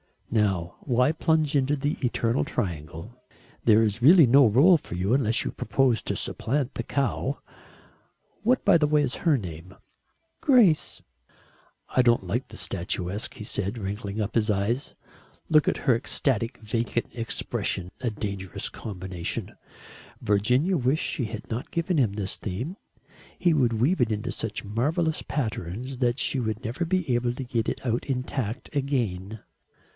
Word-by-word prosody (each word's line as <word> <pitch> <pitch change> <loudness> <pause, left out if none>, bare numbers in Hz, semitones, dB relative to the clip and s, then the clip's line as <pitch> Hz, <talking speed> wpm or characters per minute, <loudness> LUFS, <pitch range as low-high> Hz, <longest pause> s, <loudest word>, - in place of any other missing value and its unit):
"Now, 95 -6 0
why 125 +1 +2
plunge 160 -2 +1
into 140 +1 +2
the 145 +1 -1
eternal 120 0 +1
triangle? 85 - -4 0.5
There 110 0 +6
is 110 +1 -1
really 165 +4 +8
no 130 0 +6
rôle 155 - +6
for 85 - -8
you 95 +5 0
unless 120 -4 +2
you - - -3
propose 125 -1 +1
to - - -2
supplant 135 +1 -1
the - - -3
cow. 140 0 -1 1.0
What, 250 +4 +2
by - - +6
the 150 - +3
way, 150 0 +3
is 130 -2 -2
her 160 -5 +2
name?" 90 -3 -8 0.6
"Grace." 225 - +3 0.9
"I 130 - +6
don't 120 -5 +3
like 115 +9 -2
the - - -10
statuesque," 90 +2 -3
he - - -8
said, 100 +1 -2
wrinkling 100 0 -4
up 105 - -3
his 110 -1 +1
eyes. 105 +7 -1 0.5
"Look 155 -2 +4
at - - +2
her 130 -5 +5
ecstatic 120 -1 0
vacant 115 +1 -2
expression. 115 -5 -2
A 125 - -1
dangerous 100 -4 -4
combination." 90 -4 -5 0.7
Virginia 125 - +2
wished 135 +3 +1
she 125 - -2
had 110 -1 -7
not 125 +9 -4
given 170 +1 0
him 115 -7 +2
this 100 -2 -3
theme. 120 - -5 0.6
He 175 -2 +3
would 125 -6 +2
weave 130 +12 +2
it 115 -2 +2
into 105 0 -3
such 110 -1 -4
marvellous 150 - 0
patterns 120 - -4
that 120 -1 +1
she 135 0 0
would 110 -1 -3
never 125 +10 -2
be 175 -6 0
able 120 0 +1
to 135 - -4
get 120 -3 -2
it - - -5
out 120 0 0
intact 130 -3 -3
again. 110 -8 -2
120 Hz, 155 wpm, -26 LUFS, 105-140 Hz, 1.0 s, really